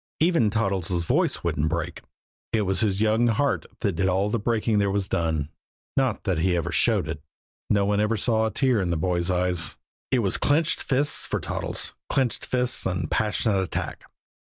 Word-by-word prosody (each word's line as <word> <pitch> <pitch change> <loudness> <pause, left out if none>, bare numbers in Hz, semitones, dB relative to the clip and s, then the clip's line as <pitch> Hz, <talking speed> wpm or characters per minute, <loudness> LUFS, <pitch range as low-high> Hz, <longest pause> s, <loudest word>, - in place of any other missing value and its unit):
Even 160 -9 +3
Toddles' 95 -5 0
voice - - +1
wouldn't 80 -2 0
break 85 +1 -3 0.5
it 110 -2 +2
was 95 0 0
his 105 -3 +1
young 110 +2 +3
heart 130 +5 0
that 100 - +1
did 95 +2 0
all 95 +3 +1
the 115 - 0
breaking 110 0 +1
there 100 -1 +2
was 100 -1 -1
done. 80 -3 -1 0.5
Not 130 -5 0
that 95 -6 0
he 90 +2 +2
ever 85 - -2
showed - - +3
it. 80 -1 -5 0.5
No 100 -1 +3
one 100 0 +1
ever 105 +1 +1
saw 110 +1 +2
a - - -3
tear 130 -6 +2
in 90 - -1
the 85 - 0
boy's 85 +2 0
eyes. 90 -2 0 0.3
It 125 -3 +2
was 95 - +1
clenched 150 +3 +1
fists 140 +3 +1
for - - -1
Toddles, - - -2 0.2
clenched 130 -3 0
fists 125 -4 -1
and 90 -3 -3
passionate 105 -1 +1
attack. 95 - -4
100 Hz, 185 wpm, -25 LUFS, 90-115 Hz, 0.5 s, Even